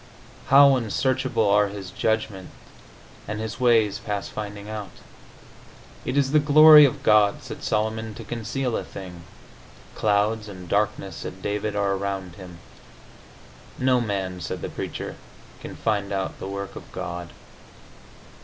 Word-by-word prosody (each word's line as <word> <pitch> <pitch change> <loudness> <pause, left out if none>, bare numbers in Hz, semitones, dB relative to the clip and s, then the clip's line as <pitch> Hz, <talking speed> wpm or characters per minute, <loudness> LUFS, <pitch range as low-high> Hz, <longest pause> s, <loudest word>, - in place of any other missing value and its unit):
"How 140 0 +7
unsearchable 125 0 0
are 105 +1 +4
his 100 -2 -8
judgments, 110 -3 -2 0.8
and 105 +1 -4
his 110 +2 -5
ways 115 -4 +3
past 105 -2 -4
finding 105 -1 -7
out!" 105 -3 -6 1.2
"It 130 - -2
is 135 -1 +2
the 155 - +5
glory 150 +1 +9
of 135 - -2
God," 105 -1 +4
said - - -8
Solomon, 110 0 -1
"to - - -8
conceal 120 +2 -3
a - - -2
thing." 90 -3 -10 0.7
"Clouds 105 +1 0
and 90 -2 -10
darkness," 100 -2 -1
said 95 +1 -8
David, 105 +1 -2
"are 100 -1 +1
around 95 -2 -4
him." 90 -2 -11 1.2
"No 130 -1 +2
man," 95 -4 -3
said - - -5
the - - -3
Preacher, - - -6 0.4
"can - - -9
find 105 -3 -1
out 95 -1 -3
the - - -6
work 100 0 -6
of - - -11
God." 85 0 -6
105 Hz, 140 wpm, -24 LUFS, 100-115 Hz, 1.2 s, glory